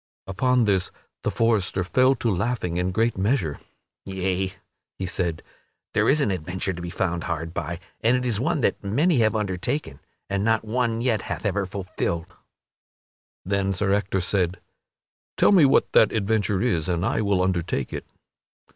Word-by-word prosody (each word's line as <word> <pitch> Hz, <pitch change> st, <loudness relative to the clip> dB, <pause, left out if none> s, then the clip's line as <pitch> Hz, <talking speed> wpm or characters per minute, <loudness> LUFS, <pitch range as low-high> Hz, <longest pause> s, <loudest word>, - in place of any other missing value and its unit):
Upon 125 Hz, +6 st, +2 dB
this 95 Hz, -3 st, +1 dB, 0.3 s
the -, -, 0 dB
forester 105 Hz, -5 st, +1 dB
fell 130 Hz, +8 st, +3 dB
to 115 Hz, -5 st, 0 dB
laughing 105 Hz, -4 st, -1 dB
in 90 Hz, +1 st, 0 dB
great 115 Hz, +2 st, 0 dB
measure. 95 Hz, -, 0 dB, 0.5 s
"Yea," 95 Hz, 0 st, -1 dB, 0.5 s
he 95 Hz, -, -3 dB
said, 85 Hz, -3 st, -2 dB, 0.5 s
"there -, -, +3 dB
is 150 Hz, +2 st, +4 dB
an 105 Hz, -, +2 dB
adventure 95 Hz, +2 st, -3 dB
to 85 Hz, -, -7 dB
be 85 Hz, -, -5 dB
found 85 Hz, -1 st, -2 dB
hard 80 Hz, -2 st, -3 dB
by 85 Hz, +1 st, -4 dB, 0.2 s
and 120 Hz, +3 st, +4 dB
it 125 Hz, -, -3 dB
is 115 Hz, -4 st, 0 dB
one 135 Hz, +3 st, 0 dB
that -, -, 0 dB
many 140 Hz, -, +2 dB
have 110 Hz, -1 st, +3 dB
undertaken 100 Hz, -, -2 dB, 0.3 s
and 100 Hz, 0 st, -1 dB
not 115 Hz, 0 st, +2 dB
one 115 Hz, 0 st, 0 dB
yet 115 Hz, -5 st, +1 dB
hath 90 Hz, 0 st, -5 dB
ever 100 Hz, -1 st, 0 dB
fulfilled." 90 Hz, -3 st, -3 dB, 1.2 s
Then 100 Hz, 0 st, 0 dB
Sir 95 Hz, +1 st, +1 dB
Ector 100 Hz, -1 st, 0 dB
said, 90 Hz, -1 st, 0 dB, 0.8 s
"Tell -, -, +5 dB
me 180 Hz, -7 st, +7 dB
what 135 Hz, -, +3 dB
that 110 Hz, -, +5 dB
adventure 105 Hz, -1 st, +1 dB
is 90 Hz, -10 st, 0 dB
and 90 Hz, +1 st, 0 dB
I 110 Hz, -, +1 dB
will 100 Hz, -3 st, +1 dB
undertake 85 Hz, -7 st, -1 dB
it." -, -, -5 dB
100 Hz, 165 wpm, -24 LUFS, 90-115 Hz, 1.2 s, me